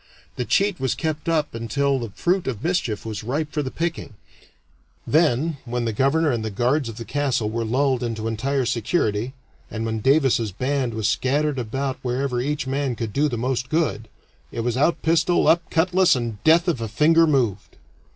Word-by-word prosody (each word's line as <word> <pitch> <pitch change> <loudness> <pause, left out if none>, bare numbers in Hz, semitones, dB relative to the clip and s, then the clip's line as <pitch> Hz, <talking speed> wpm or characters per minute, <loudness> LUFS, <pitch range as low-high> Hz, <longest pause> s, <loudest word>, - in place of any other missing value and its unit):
The 125 - -3
cheat 200 +4 +1
was 130 -2 0
kept 155 -1 -3
up 155 -2 0
until 135 +4 0
the 115 -2 -5
fruit 180 - 0
of 125 -3 -4
mischief 165 - -1
was 110 -2 -5
ripe 145 +6 -2
for 150 - -1
the 135 - -3
picking; 165 -7 -4 0.9
then, 155 0 +2
when 120 -1 -3
the 115 - -1
governor 145 +6 +2
and 115 -3 -2
the 110 - -2
guards 125 +6 0
of 110 - -9
the 115 - -6
castle 130 -6 -1
were 115 +1 -2
lulled 130 +3 +1
into 115 -2 -3
entire 130 +4 -1
security, 115 - 0 0.4
and 110 0 -4
when 110 0 -2
Davis's 130 -4 +2
band 130 +2 -1
was 110 -1 0
scattered 135 +5 0
about 130 +3 -3
wherever 125 0 -1
each 145 +2 -2
man 135 -1 -1
could 110 -2 -4
do 150 +2 +2
the 120 - -3
most 125 +1 -2
good, 155 -8 0 0.4
it 115 - -3
was 120 0 -1
out 155 +5 +2
pistol, 165 +2 +2
up 170 +1 +3
cutlass, 180 +1 +3
and 115 -4 -4
death 165 +3 +5
if 160 -9 0
a 115 - -2
finger 160 +9 +4
moved. 120 -9 0
130 Hz, 190 wpm, -23 LUFS, 115-150 Hz, 0.9 s, death